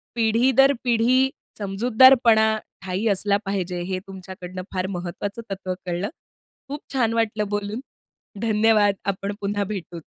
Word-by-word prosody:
पिढी 230 Hz, +3 st, +3 dB
दर 270 Hz, +1 st, +7 dB
पिढी 250 Hz, +2 st, +3 dB, 0.3 s
समजूतदारपणा 220 Hz, +1 st, +5 dB, 0.3 s
ठायी 190 Hz, +5 st, -1 dB
असला 200 Hz, +1 st, +1 dB
पाहिजे, 180 Hz, -3 st, -2 dB
हे 185 Hz, +1 st, -3 dB
तुमच्याकडनं 185 Hz, -1 st, -8 dB
फार 185 Hz, 0 st, -1 dB
महत्वाचं 190 Hz, +4 st, -5 dB
तत्व 185 Hz, -1 st, -3 dB
कळलं. 175 Hz, +3 st, -2 dB, 0.6 s
खूप 290 Hz, +2 st, -6 dB
छान 230 Hz, -4 st, +1 dB
वाटलं 215 Hz, -2 st, 0 dB
बोलून. 205 Hz, +2 st, -3 dB, 0.6 s
धन्यवाद 215 Hz, -2 st, +3 dB, 0.2 s
आपण 200 Hz, +2 st, -5 dB
पुन्हा 200 Hz, 0 st, -1 dB
भेटू. 185 Hz, -4 st, -6 dB
205 Hz, 125 wpm, -23 LUFS, 190-230 Hz, 0.6 s, दर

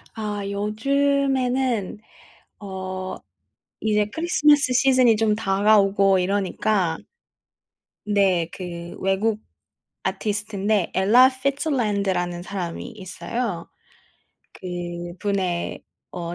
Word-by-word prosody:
아 210 Hz, -2 st, -3 dB
요즘에는 255 Hz, +1 st, 0 dB, 0.6 s
어 185 Hz, -1 st, -5 dB, 0.6 s
이제 210 Hz, -1 st, +1 dB
크리스마스 300 Hz, -5 st, +3 dB
시즌이 255 Hz, -2 st, +4 dB
좀 215 Hz, -1 st, +2 dB
다가오고 195 Hz, -2 st, +3 dB
이러니까 190 Hz, -2 st, 0 dB, 1.1 s
네. 195 Hz, -5 st, +2 dB
그 170 Hz, -2 st, -7 dB
외국 205 Hz, +3 st, 0 dB, 0.6 s
아티스트인데 210 Hz, -2 st, -1 dB
Ella 225 Hz, +7 st, +6 dB
Fitzgerald라는 210 Hz, -, -1 dB
사람이 180 Hz, -2 st, -5 dB
있어요. 200 Hz, -1 st, -5 dB, 0.9 s
그분의 175 Hz, +1 st, -3 dB, 0.3 s
어 175 Hz, -1 st, -5 dB
205 Hz, 225 characters per minute, -23 LUFS, 185-230 Hz, 1.1 s, Ella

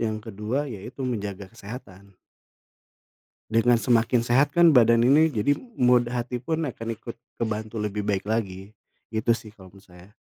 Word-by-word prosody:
yang 110 Hz, -2 st, -1 dB
ke-2 110 Hz, +6 st, -3 dB
ya 110 Hz, -9 st, -7 dB
itu, 130 Hz, +5 st, -7 dB
menjaga 100 Hz, -5 st, -4 dB
kesehatan. 100 Hz, -4 st, -11 dB, 1.3 s
Dengan 115 Hz, +2 st, +4 dB
semakin 120 Hz, 0 st, +2 dB
sehat 135 Hz, +5 st, +2 dB
kan 170 Hz, -1 st, +6 dB
badan 115 Hz, -3 st, +5 dB
ini, 145 Hz, +6 st, +5 dB
jadi 120 Hz, +6 st, +1 dB, 0.2 s
mood 125 Hz, -1 st, +4 dB
hati 125 Hz, 0 st, -3 dB
pun 160 Hz, +6 st, -2 dB
akan 115 Hz, -5 st, -5 dB
ikut 115 Hz, +1 st, -9 dB, 0.2 s
kebantu 110 Hz, 0 st, -3 dB
lebih 105 Hz, 0 st, -3 dB
baik 100 Hz, -2 st, 0 dB
lagi. 100 Hz, -3 st, -3 dB, 0.4 s
Gitu 110 Hz, +1 st, +1 dB
sih, 110 Hz, -1 st, -9 dB
kalau 95 Hz, -4 st, -16 dB
menurut 100 Hz, 0 st, -18 dB
saya. 90 Hz, +3 st, -17 dB
115 Hz, 160 wpm, -25 LUFS, 105-125 Hz, 1.3 s, kan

